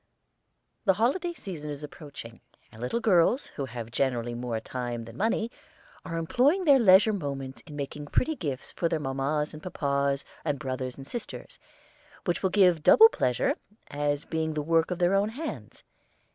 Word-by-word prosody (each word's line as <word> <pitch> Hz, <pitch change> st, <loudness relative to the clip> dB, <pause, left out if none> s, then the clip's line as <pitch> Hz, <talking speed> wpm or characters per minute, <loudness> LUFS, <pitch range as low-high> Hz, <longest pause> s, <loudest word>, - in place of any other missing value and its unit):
The 195 Hz, -, +4 dB
holiday 310 Hz, -, +1 dB
season 170 Hz, -, -7 dB
is 145 Hz, 0 st, -6 dB
approaching, 140 Hz, -6 st, -10 dB, 0.3 s
and 110 Hz, -, -13 dB
little 125 Hz, -, -1 dB
girls, 220 Hz, +4 st, +3 dB
who 140 Hz, -, -5 dB
have 120 Hz, -2 st, -7 dB
generally 120 Hz, -2 st, 0 dB
more 120 Hz, -1 st, -3 dB
time 120 Hz, -1 st, -5 dB
than 115 Hz, 0 st, -11 dB
money, 225 Hz, -, 0 dB, 0.5 s
are 165 Hz, -2 st, -4 dB
employing 270 Hz, -, +2 dB
their 280 Hz, -3 st, +7 dB
leisure 210 Hz, 0 st, +6 dB
moments 140 Hz, -7 st, -5 dB
in 150 Hz, -, -9 dB
making 145 Hz, +1 st, -5 dB
pretty 310 Hz, -, +1 dB
gifts 145 Hz, -, -4 dB
for 170 Hz, -, -1 dB
their 165 Hz, -2 st, 0 dB
papas 145 Hz, +2 st, -1 dB
and 155 Hz, -, -9 dB
mammas, 140 Hz, -5 st, 0 dB, 0.2 s
and 145 Hz, -3 st, -1 dB
brothers 130 Hz, -2 st, -4 dB
and 135 Hz, -, -9 dB
sisters, 235 Hz, -, -7 dB, 0.7 s
which 175 Hz, -, 0 dB
will 190 Hz, -, +2 dB
give 180 Hz, -4 st, +4 dB
double 445 Hz, -, +8 dB
pleasure 125 Hz, -, +1 dB, 0.4 s
as 145 Hz, 0 st, -1 dB
being 160 Hz, -1 st, -2 dB
the 150 Hz, -, -1 dB
work 165 Hz, +1 st, +2 dB
of 180 Hz, -, -2 dB
their 175 Hz, +1 st, +2 dB
own 200 Hz, +2 st, +2 dB
hands. 295 Hz, +8 st, -7 dB
150 Hz, 170 wpm, -28 LUFS, 135-195 Hz, 0.7 s, double